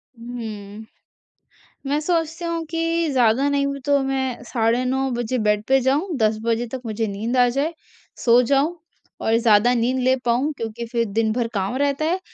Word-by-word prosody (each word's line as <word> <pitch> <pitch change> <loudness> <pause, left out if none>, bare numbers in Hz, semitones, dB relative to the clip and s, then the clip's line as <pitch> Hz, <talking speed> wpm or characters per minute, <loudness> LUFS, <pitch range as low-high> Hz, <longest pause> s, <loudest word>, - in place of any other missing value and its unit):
हम्म। 220 -3 -8 1.0
मैं 290 +1 +1
सोचती 330 0 -1
हूँ 335 -1 -2
कि 330 0 0
ज़्यादा 250 +1 +3
नहीं 280 0 +1
भी 280 0 -4
तो 285 -1 +3
मैं 265 -2 -2
साढ़े 235 0 0
9 265 +1 0
बजे 240 +1 -2
बेड 210 -1 +1
पे 270 0 +4
जाऊँ, 295 +8 0
10 215 -2 +2
बजे 230 +1 0
तक 260 - -5
मुझे 220 0 -2
नींद 220 +5 -2
आ 245 0 +5
जाए, 280 +7 -1 0.4
सो 240 0 +5
जाऊँ 280 +7 +1 0.5
और 225 - +2
ज़्यादा 230 +1 +4
नींद 245 +2 +1
ले 260 +1 +4
पाऊँ 245 +5 +1
क्योंकि 230 +1 -5
फिर 235 0 0
दिन 220 +1 +1
भर 240 0 -1
काम 195 +3 -1
रहता 285 +2 0
है। 350 +4 0
250 Hz, 180 wpm, -22 LUFS, 230-280 Hz, 1.0 s, आ